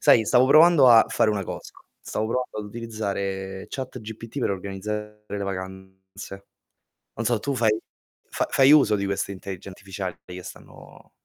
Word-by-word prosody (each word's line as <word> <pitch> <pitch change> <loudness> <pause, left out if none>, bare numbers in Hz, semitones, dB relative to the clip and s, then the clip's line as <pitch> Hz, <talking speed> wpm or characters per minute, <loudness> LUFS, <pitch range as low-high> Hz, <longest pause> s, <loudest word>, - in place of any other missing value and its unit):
sai, 110 - +5
stavo 125 +3 +4
provando 155 -2 +7
a 115 -2 +8
fare 110 - +1
una 100 -3 -1
cosa. - - -7 0.3
Stavo 110 - -3
provando 125 -1 -2
ad - - -7
utilizzare 100 -4 -4
ChatGPT 115 -1 -7
per - - 0
organizzare 105 +2 -5
le 100 0 -4
vacanze. 95 +1 -8 0.7
Non 115 - -4
so, 120 -1 +2
tu 140 +4 -2
fai 110 -3 +3 0.5
fa - - -1
fai 135 +1 +6
uso 140 -8 +6
di 100 -1 -2
queste 100 0 -2
intellige 95 0 -8
artificiali 95 -1 -6
che 90 0 -9
stanno - - -13
105 Hz, 155 wpm, -24 LUFS, 95-115 Hz, 0.7 s, a